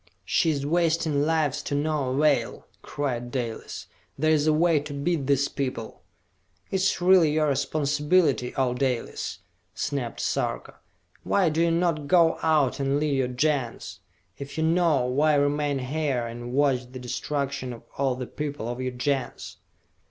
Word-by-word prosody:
"She 165 - +2
is 140 -3 -1
wasting 160 -2 +1
lives 150 -3 +1
to 145 - -3
no 145 -2 0
avail!" 135 -3 +1 0.2
cried 125 -4 -3
Dalis. 120 -3 -5 0.3
"There 155 +3 +2
is 155 -1 +2
a - - +5
way 160 0 +3
to 145 0 -7
beat 140 -1 -1
these 140 0 +3
people!" 130 -5 -5 0.7
"It 190 - +1
is 190 -1 +1
really 175 -4 +5
your 155 -1 +2
responsibility, 145 0 +1
O 130 -2 +1
Dalis!" 125 -2 -2 0.3
snapped 140 -5 -3
Sarka. - - -2 0.4
"Why 190 -4 +2
do 160 +2 0
you 170 - +3
not 165 -3 0
go 170 0 +4
out 150 -5 +2
and 140 +1 +1
lead 150 -2 0
your 130 -2 +1
Gens? 125 -7 -2 0.4
If 140 +2 -8
you 160 - +1
know, 160 -5 +3
why 145 +4 +2
remain 145 0 +1
here 135 -2 -1
and 120 +1 -7
watch 130 -2 +1
the 130 - -8
destruction 135 +1 -3
of 115 - -10
all 135 -2 0
the 125 0 -5
people 145 -4 -5
of 120 +1 -4
your 130 -1 -3
Gens?" 130 0 -3
145 Hz, 160 wpm, -26 LUFS, 130-155 Hz, 0.7 s, a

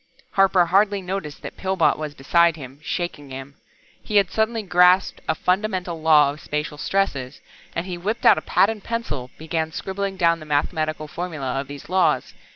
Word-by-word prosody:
Harper 195 -2 +4
hardly 200 +3 +3
noticed 180 -5 -5
that - - -8
Pillbot 190 -3 +2
was 150 -1 -6
beside 170 +4 +3
him, 135 -2 -10
shaking 155 -4 -4
him. 135 +1 -8 0.5
He 210 - -5
had 200 -3 +4
suddenly 220 0 0
grasped 180 0 +4
a 160 - +2
fundamental 180 -2 -1
law 150 -3 +5
of 145 - -10
spacial 150 0 -4
stresses, 145 -11 -1 0.4
and 170 - -2
he 180 -2 -5
whipped 210 +6 -3
out - - +7
a - - -11
pad 200 - +3
and 215 -3 -8
pencil, 150 - -4
began 160 0 -2
scribbling 195 +3 -4
down 170 -2 +3
the 155 - -10
mathematical 155 +1 -1
formula 150 -6 -4
of 135 - -5
these 140 0 -9
laws. 185 +2 +1
170 Hz, 175 wpm, -23 LUFS, 150-190 Hz, 0.5 s, out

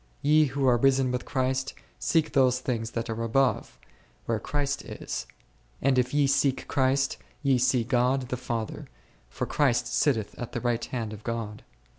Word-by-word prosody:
Ye 155 +2 +5
who 135 -1 0
are 125 -1 +5
risen 135 0 +3
with 125 0 -3
Christ, 130 -1 -1 0.2
seek 160 -2 +1
those 130 -2 +4
things 115 -3 -2
that 115 0 -2
are 115 0 -3
above, 120 +1 +1 0.5
where 115 -2 0
Christ 145 +1 -2
is; - - -6 0.5
and 135 -1 +3
if 125 0 0
ye 145 -1 +3
seek 135 -1 +1
Christ, 135 0 +1 0.3
ye 135 -3 +3
see 125 -1 +3
God 125 +2 +1
the 125 - -1
Father, 115 -3 -4 0.4
for - - -3
Christ 135 -5 +2
sitteth 115 -9 +1
on 120 - -3
the 120 - -3
right 120 -1 0
hand 115 -4 -4
of 105 0 -10
God. 115 -3 -4
130 Hz, 170 wpm, -27 LUFS, 115-135 Hz, 0.5 s, Ye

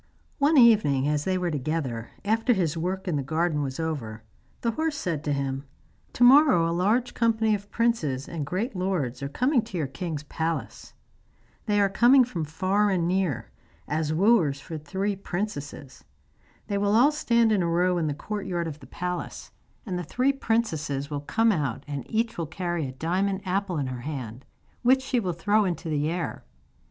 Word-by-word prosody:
One 290 +2 +4
evening, 205 - +5
as 150 0 0
they 185 -1 +1
were 180 -2 -1
together, 140 -5 -3 0.2
after 225 +4 +2
his 170 -7 0
work 185 +4 -3
in 165 -5 0
the - - 0
garden 155 +2 0
was 135 0 -4
over, 120 -9 -4 0.4
the 230 - +1
horse 315 +4 -2
said 165 - -2
to 150 - 0
him: 135 -1 -2 0.5
'To 245 - +2
morrow 260 - +7
a 165 - -1
large 215 +8 +1
company 225 -2 +2
of 205 0 -4
princes 165 - 0
and 165 -3 -4
great 195 - -3
lords 180 -10 -2
are 140 - -3
coming 250 - +2
to 215 -4 -7
your 155 - 0
king's 150 +2 -5
palace. 160 +2 -4 0.7
They 205 -1 +2
are 200 - +4
coming 240 +7 +5
from 180 -10 -3
far 190 +7 +1
and 175 -3 +1
near, 175 - -1 0.4
as 155 0 -1
wooers 170 -5 +3
for 160 +3 -8
the - - -19
three 195 +7 -2
princesses. 175 -8 -5 0.6
They 200 -1 -1
will 205 +1 +2
all 260 +6 +6
stand 235 -6 +2
in 205 -3 +3
a 170 - 0
row 175 +1 +2
in 160 - 0
the 145 - -2
courtyard 180 -2 -3
of 155 -1 -7
the 135 - -14
palace, 180 +5 -5 0.3
and 185 -4 -3
the - - -3
three 255 - +1
princesses 160 - -1
will 145 -1 -3
come 225 +9 +2
out, 145 - -2
and 140 -3 -5
each 225 -3 -1
will 165 - -2
carry 175 -2 -3
a - - -6
diamond 190 +7 -1
apple 190 -1 -1
in 140 - -1
her 130 -2 -5
hand, 125 -3 -6 0.4
which 260 +2 +4
she 260 -2 0
will 185 -5 -2
throw 205 +6 +2
into 175 -3 -3
the 150 0 0
air. 170 +1 -3
175 Hz, 190 wpm, -26 LUFS, 150-215 Hz, 0.7 s, morrow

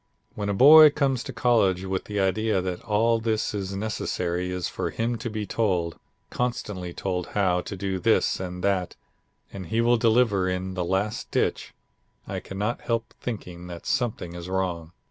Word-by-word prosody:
"When 105 -1 -3
a - - +1
boy 155 +6 +9
comes 140 -4 0
to - - -5
college 100 -7 +2
with 95 -1 -2
the 105 -1 -3
idea 105 +2 +1
that 90 -1 -3
all 115 +1 +2
that 110 -1 -1
is 100 -1 -3
necessary 90 -4 -2
is 90 -1 -2
for - - -3
him 115 +1 -1
to 120 - -4
be 110 -1 -4
told, 90 -7 -1 0.3
constantly 105 -7 -3
told 90 0 -3
how 90 -3 +2
to 100 - -7
do 95 0 -3
this - - +2
and 90 -1 -5
that, 95 -3 0 0.6
and 95 -3 -7
he 110 - -1
will 120 +1 +4
deliver 110 -5 +3
in 90 +1 -3
the 90 -1 -2
last 95 +5 -1
ditch, - - -1 0.5
I - - -3
cannot 105 +5 -3
help 115 -1 -2
thinking 90 -7 -6
that 85 -1 -9
something 120 -10 -1
is 85 +1 -7
wrong. 90 -3 -2
100 Hz, 175 wpm, -25 LUFS, 90-115 Hz, 0.6 s, boy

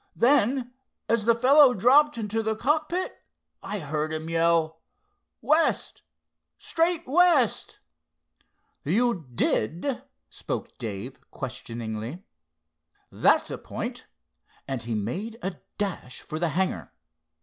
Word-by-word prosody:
Then, 250 0 +2 0.3
as 230 -2 +1
the 235 0 +5
fellow 260 +2 +6
dropped 270 +7 +5
into 220 0 -2
the 220 0 -1
cockpit, 310 +9 -1 0.4
I 200 +2 -4
heard 155 -2 -3
him 160 +1 -4
yell, 165 -1 +2 0.6
'West—straight 330 +1 -1
west.'" 310 - +3 1.0
"You 195 - 0
did?" 175 - 0 0.3
spoke - - -6
Dave, 105 -5 -6
questioningly. 115 - -6 0.9
"That's - - +3
a - - -5
point," - - -6 0.6
and 135 -3 -3
he 115 0 -3
made 185 - -4
a 190 -3 -3 0.2
dash 190 -11 -4
for 155 - -6
the 170 0 +1
hangar. 185 +5 -2
205 Hz, 105 wpm, -26 LUFS, 155-255 Hz, 1.0 s, fellow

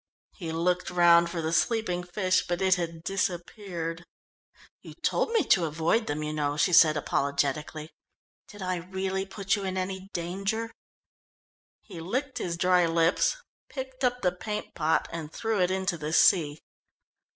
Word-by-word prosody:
He 165 -5 -6
looked 180 +2 0
round 170 -1 +5
for 170 -1 -4
the 160 +1 -1
sleeping 200 -2 +1
fish 185 +1 0
but 175 0 -1
it 190 -1 +4
had 165 -2 -3
disappeared. 175 -2 -3 0.8
"You - - -12
told - - 0
me 455 -2 +2
to 175 -3 +5
avoid 165 +9 0
them, 150 +1 -2
you 150 0 -3
know," 145 -1 -1
she 160 +4 +2
said 155 -2 +7
apologetically. 145 +2 -1 0.6
"Did 205 -2 -10
I 185 0 -1
really 190 +2 -3
put 195 +1 -1
you 200 - -5
in 190 -1 -3
any 190 +1 -4
danger?" 195 +6 -3 1.1
He 185 -6 -10
licked 260 - -3
his 170 -1 -3
dry 180 0 +3
lips, 165 - +2 0.3
picked 265 -1 -7
up 250 0 +1
the 180 - +3
paint 210 +4 -5
pot, 160 -1 +1
and 160 -2 -6
threw 225 -1 -1
it 180 - +3
into 190 -2 -1
the 150 +1 -4
sea. 155 -4 +4
180 Hz, 160 wpm, -28 LUFS, 165-195 Hz, 1.1 s, said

